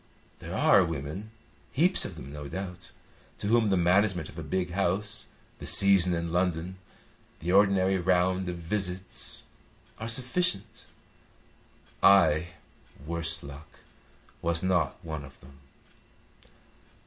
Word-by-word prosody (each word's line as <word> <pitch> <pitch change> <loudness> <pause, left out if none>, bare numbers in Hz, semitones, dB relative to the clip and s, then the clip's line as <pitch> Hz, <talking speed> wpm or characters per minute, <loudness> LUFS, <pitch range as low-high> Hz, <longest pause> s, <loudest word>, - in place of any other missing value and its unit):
There - - -7
are 95 - +5
women, 80 +5 -5 0.4
heaps 175 +6 +2
of - - -6
them, 70 +2 -10
no 75 -1 -7
doubt, 90 +1 -7 0.5
to - - -7
whom 110 0 +3
the 95 - +2
management 90 -1 +2
of 80 - -14
a - - -4
big 90 +4 -2
house, 100 +3 -1 0.3
the - - -6
season 95 -3 +5
in 85 0 -3
London, 90 +1 -1 0.6
the 85 +3 -2
ordinary 95 -1 +3
round 90 +1 +1
of 90 - -4
visits, 90 +1 -3 0.6
are 110 - -5
sufficient. 120 - -2 1.2
I, 85 -5 +5 0.6
worse 85 0 +1
luck, 70 +2 -12 0.6
was 85 0 0
not 95 -2 +1
one 80 -2 -5
of 70 -1 -14
them. 70 +1 -17
90 Hz, 125 wpm, -28 LUFS, 80-100 Hz, 1.2 s, are